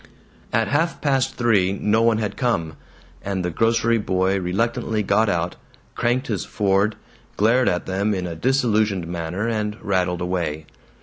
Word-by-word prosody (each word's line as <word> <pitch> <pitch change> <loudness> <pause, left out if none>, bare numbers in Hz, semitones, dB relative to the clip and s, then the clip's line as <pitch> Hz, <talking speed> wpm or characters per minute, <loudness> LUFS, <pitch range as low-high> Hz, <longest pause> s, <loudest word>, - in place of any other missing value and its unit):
At 110 0 +1
half 165 +4 0
past 135 -2 +1
three 105 -6 +2
no 105 +2 +1
one 115 -1 +3
had 105 -2 -2
come, 85 - -1 0.5
and 95 -2 -3
the 90 - -1
grocery 115 +4 +2
boy 95 -1 +1
reluctantly 105 +3 -1
got 105 +3 +2
out, 85 0 -1 0.4
cranked 125 +3 0
his - - -2
Ford, 100 +1 +1 0.4
glared 120 +5 +3
at 90 - -1
them 100 +3 0
in 90 -1 -3
a 85 -2 -5
disillusioned 110 - +1
manner, 85 +5 -3
and 105 -2 -2
rattled 90 -3 0
away. 85 -4 -2
105 Hz, 150 wpm, -22 LUFS, 90-115 Hz, 0.5 s, one